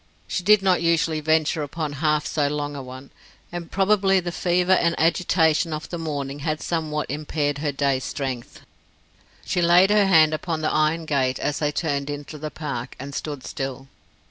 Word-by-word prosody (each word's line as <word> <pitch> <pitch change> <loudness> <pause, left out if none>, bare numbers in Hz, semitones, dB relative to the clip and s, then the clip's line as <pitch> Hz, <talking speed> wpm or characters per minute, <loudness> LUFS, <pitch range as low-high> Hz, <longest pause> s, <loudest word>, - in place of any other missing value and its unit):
She - - -2
did 205 +2 +5
not 185 -3 +3
usually 165 -1 +1
venture 155 0 +1
upon 150 0 -4
half 150 -1 +2
so 145 -2 0
long 145 0 -3
a 140 - -5
one, 130 +1 -10 0.4
and 175 -1 -6
probably 195 -1 +3
the 175 -1 -4
fever 180 +1 +1
and 170 -2 +3
agitation 165 -1 +2
of 155 0 -5
the 175 - -5
morning 145 -3 -4
had 155 +1 -2
somewhat 155 -3 -2
impaired 145 -1 -2
her 145 -1 -1
day's 135 -2 0
strength. 130 -4 -5 0.8
She 180 - 0
laid 175 +3 +5
her 210 -1 +4
hand 160 -4 +5
upon 160 0 -2
the 155 - 0
iron 155 +2 +1
gate 130 -4 0
as 145 0 -2
they 150 -1 0
turned 145 -2 -2
into 145 +1 -6
the 155 +1 -4
park, 135 -6 -5
and 140 +2 -7
stood 145 -2 -5
still. 135 0 -5
155 Hz, 180 wpm, -23 LUFS, 145-170 Hz, 0.8 s, did